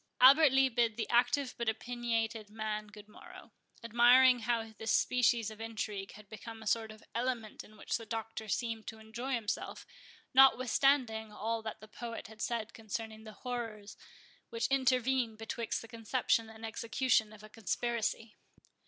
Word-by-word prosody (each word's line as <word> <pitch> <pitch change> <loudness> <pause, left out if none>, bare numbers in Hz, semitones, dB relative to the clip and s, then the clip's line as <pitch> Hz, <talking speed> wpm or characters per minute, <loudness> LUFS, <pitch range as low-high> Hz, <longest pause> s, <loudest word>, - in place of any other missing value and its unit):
Albert 275 +3 +8
Lee 270 0 +5
bid 230 -3 +1
the 220 - -2
active 255 +2 +2
but 235 -1 +1
opiniated 225 -2 -2
man 215 0 -4
good 210 0 -13
morrow; 360 - -13 0.3
admiring 245 +2 +6
how 225 -1 -1
this 225 - -1
species 235 -3 +2
of 215 0 -11
intrigue 210 -3 -4
had 210 0 -14
become 220 +1 -9
a - - -13
sort 220 +1 +1
of 215 0 -14
element 235 -3 -3
in 215 - -17
which - - -3
the 230 - -10
Doctor 225 0 -5
seemed 225 0 -2
to 220 - -6
enjoy 225 +5 -5
himself, 220 -3 -4 0.5
notwithstanding 255 -3 +4
all 225 +2 -2
that 220 -1 -7
the 215 - -11
poet 230 +2 -7
has 220 -1 -12
said 230 -2 -2
concerning 220 0 -6
the 215 - -9
horrors 225 -4 -5 0.5
which 230 -1 -2
intervene 255 -3 +2
betwixt 225 +1 -4
the - - -10
conception 230 0 0
and 220 0 -9
execution 225 0 +1
of 215 -1 -14
a - - -10
conspiracy. 225 0 -2
225 Hz, 160 wpm, -33 LUFS, 220-245 Hz, 0.5 s, Albert